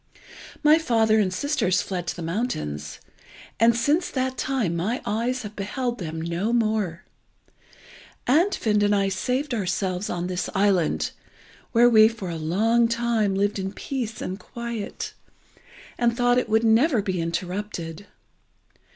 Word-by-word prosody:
My 305 +2 +6
father 225 -7 +3
and 195 -3 +1
sisters 190 - +1
fled 180 -3 -4
to - - -2
the 175 - -6
mountains, 75 - -3 0.6
and 230 +1 +5
since 300 +9 +1
that 260 -1 -1
time 250 -11 -1
my 210 +9 -1
eyes 235 +4 -1
have 210 0 -8
beheld 240 +5 -3
them 160 -3 -5
no 170 +7 -2
more. 215 -7 0 1.2
Andfind 255 - +2
and 205 0 +3
I 195 -1 +2
saved 250 +8 -1
ourselves 190 -2 -1
on 175 0 -2
this 180 0 -2
island, 190 -4 +2 0.6
where 240 0 +6
we 220 -2 +7
for 215 -6 -5
a - - -4
long 220 +9 +2
time 230 -4 0
lived 200 +1 0
in 190 +1 -3
peace 235 -2 -4
and 185 +2 -4
quiet, 235 -3 -6 0.9
and 235 -1 +2
thought 245 0 +3
it - - -3
would 220 +1 +3
never 230 +1 +4
be 185 -3 -1
interrupted. 180 +1 -4
215 Hz, 140 wpm, -24 LUFS, 185-240 Hz, 1.2 s, we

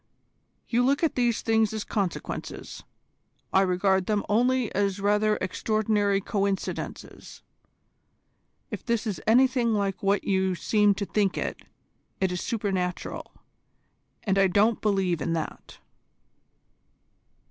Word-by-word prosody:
"You 240 +1 +2
look 275 +5 +2
at 325 - +2
these 240 -3 0
things 220 -1 +2
as 215 -1 -3
consequences, 195 -5 -4 0.7
I 190 - +5
regard 190 0 +1
them 210 -2 +1
only 245 +2 +1
as 200 -1 0
rather 210 +1 +2
extraordinary 205 +1 0
coincidences. 200 -1 -4 1.3
If - - -5
this 235 -2 -1
is 210 -4 -3
anything 245 -1 +4
like 200 -2 -1
what 200 0 +1
you 190 -1 +1
seem 210 +2 +2
to 200 +1 -3
think 200 -1 0
it, - - -3 0.6
it 190 -1 +1
is 180 - -3
supernatural, 190 -5 -3 0.9
and 195 -2 +1
I 195 - +5
don't 205 +4 +2
believe 190 -6 +1
in 165 - -1
that." 160 -2 -5
205 Hz, 120 wpm, -26 LUFS, 190-220 Hz, 1.3 s, I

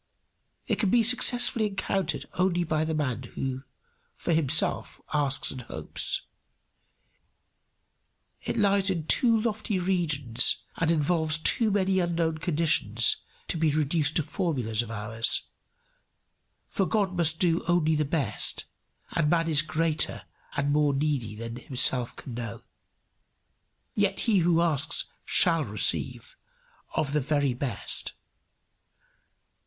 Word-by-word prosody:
It - - -1
can 205 - +1
be 235 +3 +3
successfully 245 -1 +4
encountered 195 -3 -2
only 180 -1 +1
by 155 -1 -1
the 160 0 -2
man 130 -5 -2 0.2
who 130 -1 -3 0.5
for 170 - -2
himself 155 -2 +1
asks 140 -2 +1
and 130 - -7
hopes. - - -2 2.2
It - - -4
lies 200 -1 +2
in 170 -5 -2
too 230 +5 +4
lofty 215 -2 -2
regions 155 -10 +1
and 165 - -1
involves 160 0 +1
too 220 +7 +2
many 190 -2 +1
unknown 165 -2 -1
conditions 155 - +1 0.3
to - - -1
be 160 -1 +2
reduced 155 +1 +1
to 160 - +1
formulas 140 - -1
of 120 - -8
ours; 110 +1 +1 1.2
for 195 - -1
God 200 -4 0
must 165 -2 +1
do 170 -1 +1
only 175 -3 +2
the 150 0 +1
best, 140 -7 -1 0.5
and 160 -3 0
man 165 0 +1
is 155 -3 +3
greater 160 0 -1 0.3
and 145 0 0
more 145 -1 +2
needy 135 -7 -2
than 115 +2 -7
himself 125 -2 -1
can 125 - -9
know. 115 -3 -7 1.3
Yet 200 -2 0
he 215 -5 +2
who 170 -1 +2
asks 160 -1 +1
shall - - +3
receive - - 0 0.6
of 145 -2 -1
the 150 - +1
very 145 -1 0
best. 120 -4 -1
160 Hz, 125 wpm, -27 LUFS, 140-180 Hz, 2.2 s, successfully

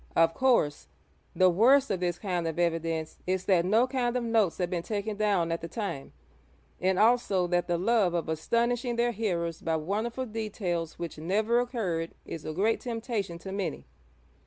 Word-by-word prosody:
Of 165 0 +4
course, 235 - +2 0.5
the 185 -1 +5
worst 260 +8 +4
of 190 - 0
this 175 -1 -1
kind 180 -4 -2
of 160 - -3
evidence 165 -2 -1
is 185 0 0
that 175 -3 +3
no 220 +6 +4
kind 250 -2 -1
of 245 - -2
notes 225 -6 +2
had 180 - 0
been 175 -2 -1
taken 210 +3 -3
down 200 -5 +1
at 165 - -2
the 165 - -5
time, 170 -7 -5 0.7
and 185 0 +1
also 215 -5 +3
that 175 0 0
the 175 -1 +1
love 195 -2 +2
of 170 - -1
astonishing 235 +9 0
their 240 +1 +2
hearers 175 -7 -2
by 165 - 0
wonderful 215 +10 -2
details 205 -7 -3
which 170 -2 -6
never 215 +8 +1
occurred 195 -10 -2
is 165 - -7
a 155 - -3
great 205 +8 +1
temptation 225 -7 -3
to 190 +3 -8
many. 195 0 -3
190 Hz, 180 wpm, -28 LUFS, 170-230 Hz, 0.7 s, the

